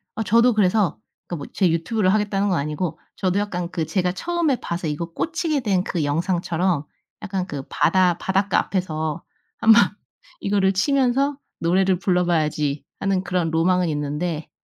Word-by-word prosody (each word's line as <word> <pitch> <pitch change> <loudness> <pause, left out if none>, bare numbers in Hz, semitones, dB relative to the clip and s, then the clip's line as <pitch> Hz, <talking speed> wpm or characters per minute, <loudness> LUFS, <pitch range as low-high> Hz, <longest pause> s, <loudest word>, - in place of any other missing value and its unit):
아 220 - -1
저도 235 +3 +4
그래서 190 - +2 0.3
그 175 - -4
뭐 145 - -6
제 185 -4 +2
유튜브를 185 +4 +1
하겠다는 205 -1 +1
건 180 - +1
아니고 150 +3 -3 0.2
저도 190 +1 0
약간 180 -4 -3
그 165 -3 -2
제가 180 0 0
처음에 335 - 0
봐서 170 -1 -4
이거 150 +3 -2
꽂히게 330 -3 -1
된 190 -5 +1
그 170 -6 -2
영상처럼 170 +1 0 0.4
약간 190 -3 -3
그 145 -5 -5
바다 180 -2 +3
'바닷가 195 +1 +1
앞에서 160 -3 -2 0.3
한번 225 +1 +7 0.6
이거를 195 -1 +2
치면서 270 +5 +1 0.2
노래를 185 +2 +2
불러 180 -1 +1
봐야지.' 150 -4 0 0.2
하는 195 -2 0
그런 175 -3 -1
로망은 180 +2 +2
있는데 150 +2 -3
185 Hz, 330 characters per minute, -22 LUFS, 165-205 Hz, 0.6 s, 한번